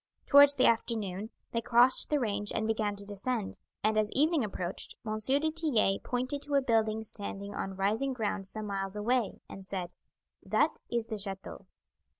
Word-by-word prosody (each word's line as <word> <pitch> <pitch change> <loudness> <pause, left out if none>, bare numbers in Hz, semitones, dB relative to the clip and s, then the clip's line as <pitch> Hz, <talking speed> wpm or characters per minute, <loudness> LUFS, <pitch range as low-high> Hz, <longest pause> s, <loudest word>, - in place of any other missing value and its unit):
Towards 285 0 +8
the 260 - +3
afternoon 220 -3 0 0.2
they 230 - -1
crossed 245 +2 +4
the 295 - +2
range 205 -4 -2
and 220 - 0
began 215 -2 0
to 200 0 -5
descend, 205 +2 -3 0.2
and 215 +1 +3
as 210 -1 +1
evening 305 0 +3
approached 185 -3 -3
M. 215 0 -2
du 285 +6 +3
Tillet 285 -12 +1
pointed 255 +3 -1
to 285 0 -2
a 280 - +5
building 220 -2 +1
standing 200 -1 -5
on 195 0 -4
rising 215 +8 0
ground 210 -5 -1
some 215 +2 -4
miles 195 -1 -3
away 230 +1 0
and 195 - -10
said: 185 -2 -5 0.5
"That - - +1
is 235 -2 0
the 220 -2 -5
chateau." 195 -1 -4
220 Hz, 170 wpm, -30 LUFS, 200-255 Hz, 0.5 s, Towards